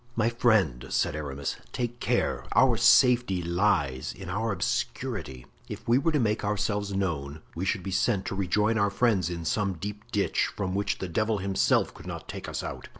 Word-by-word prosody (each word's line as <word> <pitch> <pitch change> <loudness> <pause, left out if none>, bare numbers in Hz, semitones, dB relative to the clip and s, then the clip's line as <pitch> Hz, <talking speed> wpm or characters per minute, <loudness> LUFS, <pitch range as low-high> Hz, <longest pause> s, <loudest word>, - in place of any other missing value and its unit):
"My 115 0 +2
friend," 105 - +2
said - - 0
Aramis, 70 -2 -4 0.2
"take 120 -1 -3
care; - - 0
our - - +5
safety 120 -8 +4
lies 85 -7 0
in 95 -2 -9
our 110 +4 -1
obscurity. 100 - -3 0.2
If - - -8
we 120 +3 +4
were 165 +4 +1
to 150 - +1
make 110 -2 0
ourselves 105 0 -1
known 80 -6 -2
we 90 +3 -3
should 95 0 -1
be 95 - -4
sent 95 +1 +1
to - - -3
rejoin 105 +4 +1
our 100 -1 +3
friends 100 -4 +1
in 85 -1 -5
some 100 +3 0
deep 105 +5 -7
ditch, 105 -4 +1
from 95 -2 -2
which 100 +1 -1
the 95 - -4
devil 110 +6 0
himself 95 0 +1
could - - -12
not - - -6
take - - -6
us - - -4
out. - - -6
100 Hz, 190 wpm, -27 LUFS, 85-110 Hz, 0.2 s, our